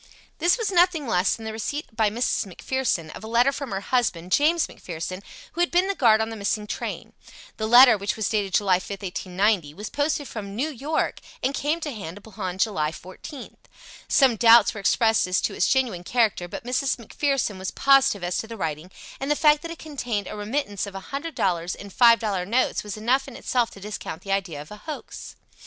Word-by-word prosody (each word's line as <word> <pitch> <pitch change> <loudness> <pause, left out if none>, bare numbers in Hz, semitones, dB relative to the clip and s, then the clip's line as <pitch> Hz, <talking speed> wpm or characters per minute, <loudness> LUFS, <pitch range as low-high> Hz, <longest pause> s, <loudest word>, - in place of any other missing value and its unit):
This 345 +6 +3
was 450 -4 -1
nothing 350 -4 +3
less 185 -5 +2
than 225 - -10
the 220 - -3
receipt 225 +3 -5
by 220 -2 +3
Mrs. 230 -1 -1
McPherson 185 -5 -2
of - - -10
a - - -7
letter 240 +4 +3
from 280 -1 -6
her 195 -2 -3
husband, 195 -7 -1
James 315 - +3
McPherson, 180 +2 -7 0.3
who 345 - -2
had 350 - +3
been 360 +2 +2
the 395 - 0
guard 225 - +4
on 220 - -1
the - - -5
missing 210 0 -2
train. - - -5 0.4
The 220 - -2
letter, 245 -1 +8
which 200 +1 -2
was 220 - -1
dated 200 -4 0
July 190 -3 +3
5th, 200 +1 -8
1890, 185 -3 0
was 210 +4 -7
posted 290 -1 -1
from 205 -3 -7
New 275 +8 -1
York 300 +3 -2 0.2
and 265 +2 +1
came 300 +4 -1
to 300 - -3
hand 195 -5 -7
upon 195 -3 -6
July 190 -7 +1
14th. 185 - -10 0.5
Some 260 -5 +4
doubts 230 0 +6
were 215 - -7
expressed 220 +1 +2
as 185 0 +1
to - - -1
its - - +1
genuine 245 -10 +1
character 215 -4 +1
but 260 +10 -7
Mrs. 255 +3 0
McPherson 250 -3 -2
was 190 - -3
positive 275 -7 +3
as 175 0 -1
to 225 - -5
the 230 0 -8
writing, 160 -1 -4 0.3
and 270 - -3
the 295 - +3
fact 300 0 +4
that 335 - -7
it 335 - -7
contained 245 -10 -4
a - - -7
remittance 210 -1 -3
of 195 - -9
a - - -4
hundred 285 +2 -4
dollars 175 -4 0
in 200 0 -10
five 235 +2 +6
dollar 205 -5 -2
notes 235 +8 0
was 210 0 -6
enough 255 +5 +1
in 265 - -10
itself 245 -3 0
to - - -13
discount 195 -4 -7
the 195 - -5
idea 190 -6 -1
of 150 +5 -10
a 210 - -8
hoax. 300 +7 -8
220 Hz, 215 wpm, -24 LUFS, 195-270 Hz, 0.5 s, letter